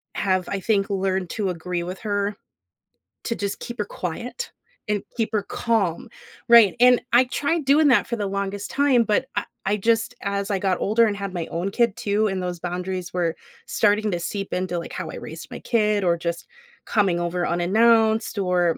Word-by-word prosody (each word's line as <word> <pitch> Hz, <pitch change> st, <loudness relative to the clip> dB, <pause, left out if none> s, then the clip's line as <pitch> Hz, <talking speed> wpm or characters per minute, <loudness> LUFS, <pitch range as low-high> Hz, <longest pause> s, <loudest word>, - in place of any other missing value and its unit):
have, 185 Hz, -2 st, 0 dB
I 195 Hz, -, -2 dB
think, 200 Hz, -1 st, +1 dB
learned 190 Hz, -2 st, -1 dB
to 205 Hz, -3 st, -1 dB
agree 175 Hz, 0 st, -3 dB
with 180 Hz, +2 st, -6 dB
her, 205 Hz, -1 st, -1 dB, 0.9 s
to 230 Hz, -, -1 dB
just 200 Hz, -1 st, -3 dB
keep 240 Hz, -1 st, -7 dB
her 210 Hz, -, 0 dB
quiet, 235 Hz, -, -5 dB, 0.4 s
and 210 Hz, -1 st, 0 dB
keep 225 Hz, -2 st, 0 dB
her 210 Hz, -2 st, +1 dB
calm, 200 Hz, -7 st, -1 dB, 0.4 s
right? 230 Hz, -5 st, +8 dB
And 250 Hz, 0 st, +6 dB
I 245 Hz, +2 st, +6 dB
tried 290 Hz, +5 st, -1 dB
doing 290 Hz, +2 st, +5 dB
that 250 Hz, -, +4 dB
for 235 Hz, -, -2 dB
the 205 Hz, -, -2 dB
longest 200 Hz, +1 st, -3 dB
time, 275 Hz, -4 st, +3 dB
but 215 Hz, +5 st, +1 dB
I -, -, -1 dB, 0.2 s
I 200 Hz, +2 st, +1 dB
just 225 Hz, +2 st, +1 dB
as 200 Hz, +1 st, -2 dB
I 195 Hz, -, 0 dB
got 185 Hz, -2 st, 0 dB
older, 220 Hz, +3 st, +4 dB
and 205 Hz, -, -1 dB
had 200 Hz, -1 st, -5 dB
my 170 Hz, -3 st, -3 dB
own 175 Hz, +4 st, -3 dB
kid, 235 Hz, -1 st, +2 dB
too, 210 Hz, +1 st, +1 dB
and 190 Hz, -2 st, -2 dB
those 180 Hz, -1 st, -4 dB
boundaries 180 Hz, +1 st, -4 dB
were 175 Hz, -2 st, 0 dB, 0.3 s
starting 210 Hz, 0 st, +2 dB
to 175 Hz, -, -1 dB
seep 195 Hz, +3 st, -4 dB
into, 180 Hz, -1 st, -1 dB
like, 170 Hz, -, -8 dB
how -, -, -5 dB
I -, -, -7 dB
raised -, -, -9 dB
my -, -, -6 dB
kid, 210 Hz, -3 st, +1 dB
or 170 Hz, -2 st, +2 dB
just 170 Hz, 0 st, -4 dB, 0.4 s
coming 200 Hz, -5 st, +2 dB
over 175 Hz, +1 st, -1 dB
unannounced, 220 Hz, +5 st, +3 dB
or, 180 Hz, -3 st, +1 dB
200 Hz, 195 wpm, -23 LUFS, 180-225 Hz, 0.9 s, right